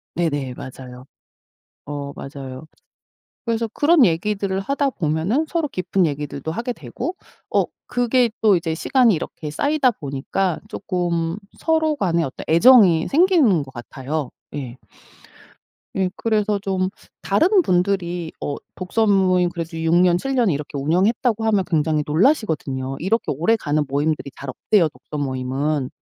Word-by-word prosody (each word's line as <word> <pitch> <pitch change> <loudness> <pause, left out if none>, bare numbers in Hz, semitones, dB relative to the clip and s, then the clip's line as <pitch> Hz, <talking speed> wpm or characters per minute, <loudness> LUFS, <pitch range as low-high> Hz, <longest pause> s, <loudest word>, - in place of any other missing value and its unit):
네네. 145 -6 -1
맞아요. 125 -1 -10 0.8
어 145 -1 -5
맞아요. 135 0 -8 0.8
그래서 230 -1 -1
그런 300 +1 +5
얘기들을 195 +2 0
하다 275 +6 0
보면은 180 - 0
서로 330 -3 0
깊은 185 -4 0
얘기들도 145 0 -4
하게 235 +6 -3
되고 305 +8 -6 0.3
어 - - +3 0.2
그게 245 0 +2
또 215 -3 +6
이제 165 -2 -2
시간이 240 +5 +3
이렇게 155 -1 -5
쌓이다 285 - +2
보니까 155 +3 -2
쪼끔 170 -4 -2 0.2
서로 315 -1 +1
간에 170 -9 +1
어떤 135 -5 -5
애정이 175 -2 +6
생기는 300 - +4
것 135 -1 -11
같아요. 130 +3 -5 0.2
예. 130 -4 -5 1.2
예 190 -1 +1
그래서 210 -2 0
좀 190 -1 -1 0.3
다른 360 - +3
분들이 180 - 0
어 145 - -2 0.2
독서 215 +5 0
모임 185 -3 +3
그래도 165 -1 -6
6 165 +1 +2
년, 175 0 +4
7 270 +9 -3
년 240 -5 +3
이렇게 145 -2 -3
운영했다고 205 - +1
하면 210 -3 +3
굉장히 155 -2 +1
놀라시거든요. 150 - 0
이렇게 220 +7 0
오래가는 155 -2 +1
모임들이 140 0 -1
잘 140 - -7
없대요, 170 - +2
독서 150 - -9
모임은. 135 +1 -2
175 Hz, 300 characters per minute, -21 LUFS, 150-225 Hz, 1.2 s, 또